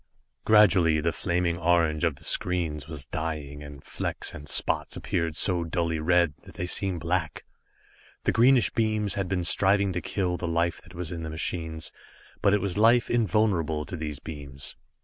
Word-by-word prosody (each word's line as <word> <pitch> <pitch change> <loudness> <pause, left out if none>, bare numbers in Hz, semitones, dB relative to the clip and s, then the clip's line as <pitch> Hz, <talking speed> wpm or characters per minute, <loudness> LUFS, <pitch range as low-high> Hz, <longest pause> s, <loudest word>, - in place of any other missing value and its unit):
Gradually 95 -7 +5
the 85 +2 0
flaming 85 0 -1
orange 85 -3 +2
of 80 -5 +1
the - - -18
screens 85 -5 0
was 75 -4 -6
dying 75 -2 -5
and 70 -1 -11
flecks - - -4
and 75 -1 -9
spots - - +1
appeared 85 -3 -2
so 85 +2 +3
dully 85 -1 -1
red, 85 -1 +2
that - - -15
they 90 - -3
seemed 90 -1 -1
black. 85 -3 -2 0.8
The - - +2
greenish 125 +1 +4
beams 110 -2 +1
had 95 -2 -2
been 90 -2 -1
striving 100 +2 +3
to 90 - -2
kill 90 -3 -2
the 85 - -4
life 85 +1 0
that 85 0 -16
was 85 -2 -4
in 85 -1 -5
the 80 - -5
machines, 80 0 -3 0.5
but 100 - +4
it 105 -1 +2
was 100 0 -2
life 115 +2 +4
invulnerable 100 -9 +1
to 95 - -6
these 75 -3 -5
beams. 70 -2 -7
85 Hz, 175 wpm, -26 LUFS, 80-95 Hz, 0.8 s, Gradually